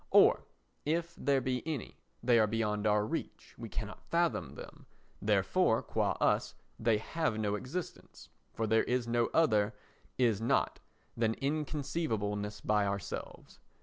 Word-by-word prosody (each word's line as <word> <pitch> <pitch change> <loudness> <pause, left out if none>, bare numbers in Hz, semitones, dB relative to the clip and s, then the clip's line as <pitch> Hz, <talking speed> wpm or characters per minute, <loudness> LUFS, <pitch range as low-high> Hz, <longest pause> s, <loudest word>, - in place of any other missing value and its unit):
Or, - - +5 0.4
if 170 +3 -1
there 140 -2 +1
be 125 -1 -1
any, 150 -8 -5 0.2
they 120 -1 +5
are 110 - +4
beyond 105 -1 0
our 105 0 +3
reach—we - - -6
cannot - - -6
fathom 165 - 0
them; - - -11 0.3
therefore, - - +2
qua - - 0
us, - - +1 0.2
they 110 -1 +3
have 140 +1 -1
no 105 -2 0
existence, 130 +11 -6 0.2
for 110 - -2
there 110 +1 +3
is 125 -1 0
no 120 0 +2
other 110 -9 +2 0.4
"is 115 -5 +2
not" 115 - +1 0.4
than 115 -1 +1
inconceivableness 135 -8 -2
by 105 -1 +2
ourselves. 100 0 -5
115 Hz, 135 wpm, -32 LUFS, 105-140 Hz, 0.4 s, Or